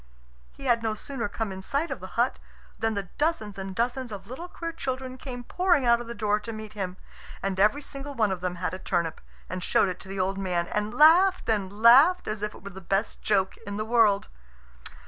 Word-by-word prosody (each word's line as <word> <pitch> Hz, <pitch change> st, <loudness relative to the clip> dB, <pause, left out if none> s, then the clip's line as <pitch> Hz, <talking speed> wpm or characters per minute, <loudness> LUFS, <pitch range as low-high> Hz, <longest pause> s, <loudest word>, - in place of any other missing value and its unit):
He 275 Hz, -, -11 dB
had 240 Hz, -2 st, +3 dB
no 220 Hz, -1 st, -1 dB
sooner 235 Hz, -1 st, -4 dB
come 220 Hz, 0 st, -3 dB
in 190 Hz, 0 st, -6 dB
sight 280 Hz, -, -1 dB
of 270 Hz, -, -3 dB
the 185 Hz, +4 st, -10 dB
hut 240 Hz, +2 st, +2 dB, 0.4 s
than 225 Hz, 0 st, 0 dB
the 195 Hz, -3 st, -4 dB
dozens 220 Hz, -11 st, 0 dB
and 190 Hz, 0 st, -5 dB
dozens 245 Hz, +2 st, -1 dB
of 200 Hz, -2 st, -7 dB
little 265 Hz, -, -7 dB
queer 335 Hz, -1 st, -5 dB
children 260 Hz, -4 st, -4 dB
came 250 Hz, -1 st, -7 dB
pouring 350 Hz, -1 st, +2 dB
out 235 Hz, 0 st, +4 dB
of 240 Hz, -, -8 dB
the 235 Hz, -, -6 dB
door 210 Hz, -2 st, +1 dB
to 215 Hz, +2 st, -7 dB
meet 215 Hz, -1 st, -8 dB
him. 190 Hz, -3 st, -4 dB, 0.5 s
And 195 Hz, -1 st, -1 dB
every 215 Hz, +9 st, +3 dB
single 280 Hz, 0 st, -7 dB
one 215 Hz, -4 st, +2 dB
of 185 Hz, -2 st, -3 dB
them 180 Hz, -1 st, -2 dB
had 180 Hz, 0 st, -3 dB
a 185 Hz, -, -5 dB
turnip, 170 Hz, -3 st, -1 dB, 0.3 s
and 185 Hz, 0 st, -5 dB
showed 195 Hz, -, +3 dB
it 180 Hz, -, -5 dB
to -, -, -13 dB
the 195 Hz, 0 st, -4 dB
old 195 Hz, +1 st, 0 dB
man, 180 Hz, -3 st, 0 dB
and 210 Hz, 0 st, -1 dB
laughed 335 Hz, +8 st, +6 dB
and 205 Hz, 0 st, -1 dB
laughed 280 Hz, +10 st, +7 dB
as 215 Hz, -1 st, -3 dB
if 210 Hz, 0 st, -3 dB
it -, -, -14 dB
were 200 Hz, -, -7 dB
the 190 Hz, 0 st, -10 dB
best 195 Hz, +4 st, -1 dB
joke 195 Hz, -3 st, +1 dB
in 205 Hz, 0 st, -7 dB
the 215 Hz, -, -2 dB
world. 220 Hz, -3 st, +3 dB
215 Hz, 230 wpm, -27 LUFS, 195-260 Hz, 0.5 s, laughed